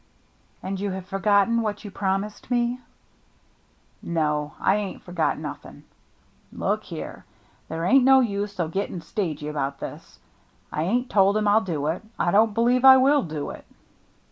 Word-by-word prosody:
" - - -37
And 190 0 -4
you 200 +1 -2
have 190 -1 -5
forgotten 200 +4 +2
what 215 0 -4
you 205 - -7
prom 195 0 0
ised 210 0 -11
me? 240 0 0 0.4
" - - -38
" - - -38
No, 150 -3 -1
I 195 - +3
ain't 205 -3 -5
forgot 175 -3 -1
nothing. - - -8 0.7
Look - - -2
here, - - -8 0.5
there 165 +1 -3
ain't 265 +6 +5
no 265 +1 +7
use 205 -4 -2
o' 170 - +1
getting 185 +1 -3
stagy 165 -5 -4
about 140 -2 -3
this. - - -9 0.5
I 155 - -1
ain't 245 +7 -1
told 200 +1 +4
him 210 -1 0
I'll 210 +2 +5
do 160 -7 -3
it. 160 +4 -1 0.2
I 175 - +1
don't 215 +1 +3
believe 245 +2 +2
I 265 0 +10
will 275 +2 +4
do 155 - -5
it." - - -11
200 Hz, 175 wpm, -24 LUFS, 170-225 Hz, 0.7 s, I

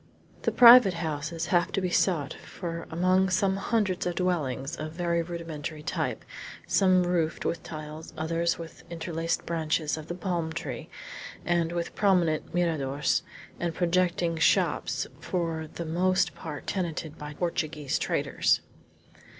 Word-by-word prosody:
The - - +1
private 235 -6 +9
houses 160 0 -3
have 175 +2 +3
to - - +1
be 185 -2 -1
sought 160 -6 +1
for 170 -2 -7
among 185 +3 +3
some 190 +1 +2
hundreds 195 -4 0
of 175 - -2
dwellings, 150 -7 -1
of 155 0 -6
very 170 0 0
rudimentary 165 -3 -6
type, - - -2 0.4
some 185 -2 +4
roofed 175 -3 0
with 170 - -1
tiles, 155 0 -8
others 165 +2 0
with 165 -1 -10
interlaced 165 -1 -2
branches 160 -2 0
of 155 0 -8
the 175 - -4
palm 175 -3 -2
tree, - - -5 0.6
and 170 -1 +1
with 170 -1 -3
prominent 180 -6 +2
miradors, 150 -5 +1 0.4
and 170 -2 -2
projecting 175 -1 +1
shops 160 - +2
for 165 -3 -2
the 170 - -5
most 185 +3 +2
part 150 -3 -7
tenanted 165 -4 -3
by 150 0 -7
Portuguese 155 -4 -1
traders. - - +1
170 Hz, 135 wpm, -28 LUFS, 160-180 Hz, 0.6 s, private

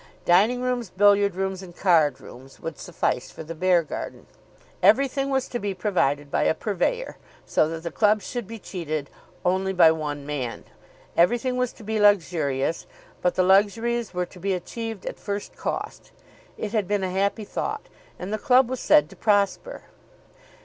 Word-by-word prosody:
Dining 215 +8 +4
rooms, 250 -4 -1
billiard 200 0 +4
rooms, 190 0 -2
and 175 -2 -12
card 160 -7 +3
rooms 130 +2 -13
would 165 -3 -6
suffice - - -2
for - - -9
the 165 +1 -7
Beargarden. 175 -1 -1 0.6
Everything 275 0 +3
was 265 -1 0
to 240 - -3
be 200 -2 -3
provided 145 -7 0
by - - +1
a - - +3
purveyor, 475 - -2 0.3
so 155 - +2
that 165 0 -6
the 170 - -4
club 210 +2 +2
should 240 -5 -5
be 230 - -7
cheated 155 -8 -5 0.3
only 190 +1 +1
by 170 -3 +7
one 145 -3 -4
man. 135 -5 -4 0.5
Everything 240 +8 +2
was 250 -1 0
to - - -14
be 220 +1 -2
luxurious, 165 -8 +2 0.3
but 180 - +1
the 185 - +3
luxuries 215 +5 +2
were 180 -1 -2
to 180 - -15
be 195 +2 -1
achieved 225 +3 -6
at - - -6
first 205 0 -5
cost. - - -5 0.5
It 210 - -4
had 215 -5 0
been 205 -1 0
a 185 - -2
happy 200 +3 0
thought, 430 - -4 0.3
and 190 +4 -5
the 215 - -1
club 255 -1 +4
was 260 - -2
said 300 -1 +5
to - - -12
prosper. 205 - 0
195 Hz, 170 wpm, -25 LUFS, 170-225 Hz, 0.6 s, by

